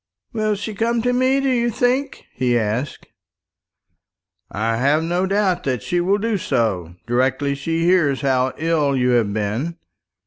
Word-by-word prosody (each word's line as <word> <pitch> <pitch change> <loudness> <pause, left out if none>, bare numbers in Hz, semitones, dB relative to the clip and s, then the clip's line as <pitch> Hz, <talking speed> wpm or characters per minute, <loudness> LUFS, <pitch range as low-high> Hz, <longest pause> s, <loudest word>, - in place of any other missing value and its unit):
"Will 215 -2 0
she 210 +2 -5
come 230 +2 0
to 245 0 +1
me, 260 +2 +2
do 275 - 0
you 240 -2 +1
think?" 255 +4 -1
he 125 -1 +1
asked. 115 +5 -2 1.4
"I 115 +3 -1
have 145 +6 +2
no 175 +3 0
doubt 195 -2 +1
that 125 -5 -1
she 175 0 0
will 195 +3 +2
do 215 -1 -1
so, 100 - -1
directly 130 +3 0
she 165 +4 -2
hears 165 -7 +3
how 130 -2 +1
ill 155 -4 +1
you 125 0 +2
have 120 -4 +2
been. 110 +11 -2
155 Hz, 160 wpm, -20 LUFS, 125-210 Hz, 1.4 s, hears